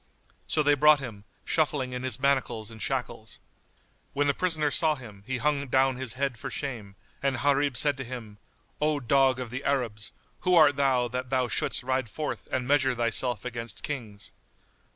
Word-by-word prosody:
So 155 - +2
they 145 0 +4
brought 150 +1 +6
him, 110 -7 -8 0.2
shuffling 140 -5 0
in 125 - -4
his 130 -2 -2
manacles 125 -5 0
and 110 -1 -11
shackles. 125 -5 -3 0.7
When 145 +1 +1
the 140 - +3
prisoner 155 -3 +1
saw 155 0 +3
him, 110 -7 -12
he 130 0 -1
hung 140 +1 0
down 130 0 +2
his 130 -4 -4
head 130 -3 -2
for - - -5
shame; 115 -9 -5 0.3
and 135 -1 0
Gharib 140 -1 +1
said 145 -2 +2
to 135 - -4
him, 115 -5 -8 0.4
"O 150 -1 +2
dog 135 0 +3
of 125 -3 -5
the 130 +3 -4
Arabs, 115 -6 -1 0.3
who 180 -1 +2
art 150 -4 +6
thou 130 -3 +2
that 125 +1 -4
thou 130 -1 +1
shouldst - - +1
ride 130 -2 -1
forth 150 +8 -4
and 125 -1 -1
measure 135 -2 +3
thyself 120 +1 +1
against 115 -3 -6
kings?" 110 -8 -6
130 Hz, 180 wpm, -27 LUFS, 120-140 Hz, 0.7 s, brought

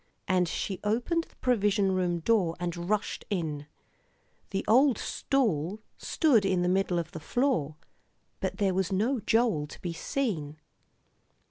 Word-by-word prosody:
And 180 -1 +2
she 190 0 -3
opened 245 +11 0
the - - -26
provision 205 -5 +2
room 180 -2 0
door 185 -4 +2
and 175 0 -4
rushed 210 -1 -1
in. 155 -7 -3 0.8
The 195 - -2
old 255 +1 +5
stool 210 - 0 0.2
stood 270 - +2
in 185 -2 +1
the - - +1
middle 185 -1 +1
of 170 -1 -3
the 160 - -7
floor, 160 - 0 0.6
but - - -3
there 195 -3 +1
was 190 -1 0
no 230 +7 +1
Joel 220 -8 +1
to - - -12
be 175 -2 -4
seen. 165 - -2
195 Hz, 145 wpm, -29 LUFS, 175-225 Hz, 0.8 s, old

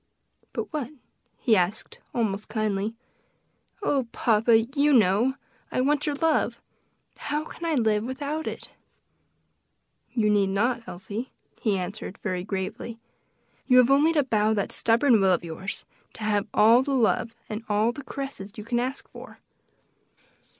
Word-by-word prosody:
"But - - -5
what?" 285 -6 -2 0.5
he 230 -5 +3
asked 185 +2 -1
almost 210 -3 -1
kindly. 215 -1 -1 0.9
"Oh, 275 - +1
papa! 225 0 +4
you 285 +5 +1
know! 225 +3 +4 0.4
I - - -1
want 290 +3 +1
your 295 - 0
love. 320 +1 +1 0.6
How 300 +1 -2
can 335 - -8
I 325 -2 +1
live 220 -4 +2
without 285 +5 -4
it?" - - -6 1.4
"You 215 -3 +2
need 200 -2 +3
not, 235 +5 +1
Elsie," 200 +7 -5 0.3
he 210 -4 +1
answered 190 +1 -5
very 185 -3 -2
gravely, 195 +4 -4 0.7
"you 255 - +6
have 250 +1 +6
only 290 +4 +5
to 295 -3 +3
bow 220 -3 +2
that 200 - -1
stubborn 230 0 +3
will 190 -1 +4
of 175 - 0
yours, 170 +4 -6 0.3
to 220 - -7
have 205 -1 +1
all 230 +4 +6
the 275 +1 -1
love 230 -1 +1
and 215 +1 -5
all 210 +3 +2
the 285 +3 -9
caresses 270 -9 -6
you 215 - -7
can 240 +2 -1
ask 260 +3 -3
for." - - -12
225 Hz, 150 wpm, -26 LUFS, 205-265 Hz, 1.4 s, you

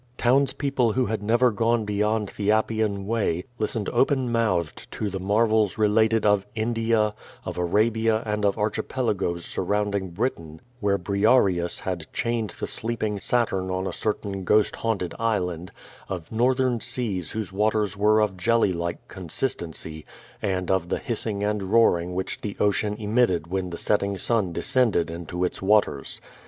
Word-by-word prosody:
Townspeople 135 -1 +2
who 130 +2 +1
had 110 -1 -2
never 120 +4 +3
gone 115 +1 +1
beyond 105 0 0
the 105 -1 -3
Appian 110 -2 0
Way, 100 -6 0 0.2
listened 110 -1 -1
open 130 0 +2
mouthed 95 -9 -1
to 105 -2 -3
the 95 - -3
marvels 105 +1 +2
related 110 +1 +3
of 105 -2 +4
India; 115 -1 +1 0.3
of - - -4
Arabia 110 +5 +2
and 105 -1 -2
of 100 +1 +2
archipelagoes 105 -5 -1
surrounding 100 0 -1
Britain, 85 -6 -3 0.2
where 100 -2 +1
Briareus 100 -2 +2
had 85 -4 -4
chained 115 -4 -2
the - - -2
sleeping 110 -3 -2
Saturn 95 -5 0
on 95 0 -2
a - - -3
certain 100 -2 -3
ghost 105 +3 +3
haunted 105 -6 -2
island; 90 -6 -1 0.4
of 90 -4 -5
northern 125 +1 +2
seas 100 - -2
whose 110 -4 -4
waters 105 0 +1
were 105 +2 +4
of 105 -3 0
jelly 115 0 +2
like 85 0 -4
consistency; 80 - -4 0.4
and 95 -2 -1
of 90 -2 0
the - - 0
hissing 110 -3 -3
and 105 0 0
roaring 95 -4 +2
which 95 - -3
the 105 -2 -5
ocean 105 +1 +1
omitted 105 -6 +1
when 90 +1 -3
the 85 - -6
setting 100 -1 +1
sun 105 -2 0
descended 105 -3 +1
into 85 +2 -3
its - - -4
waters. 95 -8 +1
105 Hz, 150 wpm, -25 LUFS, 95-115 Hz, 0.4 s, of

